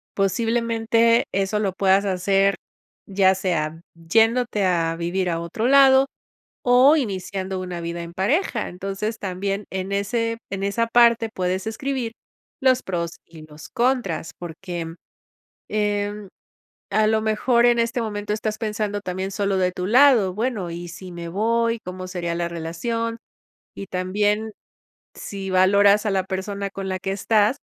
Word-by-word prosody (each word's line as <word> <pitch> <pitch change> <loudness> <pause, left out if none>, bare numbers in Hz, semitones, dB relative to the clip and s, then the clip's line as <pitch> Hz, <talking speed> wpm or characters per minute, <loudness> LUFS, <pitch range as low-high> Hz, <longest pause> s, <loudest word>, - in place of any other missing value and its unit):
posiblemente 230 +2 +2
eso 195 +2 0
lo 200 -2 0
puedas 195 +1 +3
hacer, 195 +1 +2 0.5
ya 190 -1 +4
sea 165 -4 -2
yéndote 225 +5 +2
a 165 -2 +1
vivir 175 +2 -1
a 165 -1 -1
otro 170 +8 -2
lado 270 0 +6 0.6
o 255 +5 +6
iniciando 190 - -3
una 180 -2 -5
vida 170 0 -4
en 170 0 -9
pareja. 235 - 0
Entonces 195 +4 -4
también 195 +1 -3
en 190 +1 -4
ese 230 +3 -1
en 195 0 -4
esa 215 +4 0
parte 235 -1 +4
puedes 185 0 -2
escribir 245 +1 -3 0.5
los 260 -1 +3
pros 170 -3 -3
y 165 -2 -13
los 150 0 -12
contras. 240 -10 -1
Porque, 170 -1 -6 0.8
eh, 205 -1 -1 0.6
a 215 +2 +3
lo 220 0 +2
mejor, 235 +3 +2
en 240 -1 +4
este 230 +1 0
momento 210 -2 -3
estás 215 0 -3
pensando 210 -2 -2
también 190 0 -4
solo 200 -1 0
de 180 -1 +1
tu 180 0 -4
lado, 240 -5 +5
bueno, 215 -4 -2
¿y 175 +1 -6
si 180 +2 -9
me 170 -1 -7
voy? 230 +4 +1
¿Cómo 185 0 -7
sería 175 -2 -3
la 170 0 -1
relación? 230 +8 -3 0.6
Y 200 - -6
también, 205 +4 0 0.6
si 195 -1 -6
valoras 200 +3 +5
a - - +1
la 190 -1 0
persona 200 +1 -4
con 195 0 -6
la 185 0 -2
que 195 +1 -3
estás, 210 +4 +2
200 Hz, 145 wpm, -23 LUFS, 185-225 Hz, 0.8 s, lado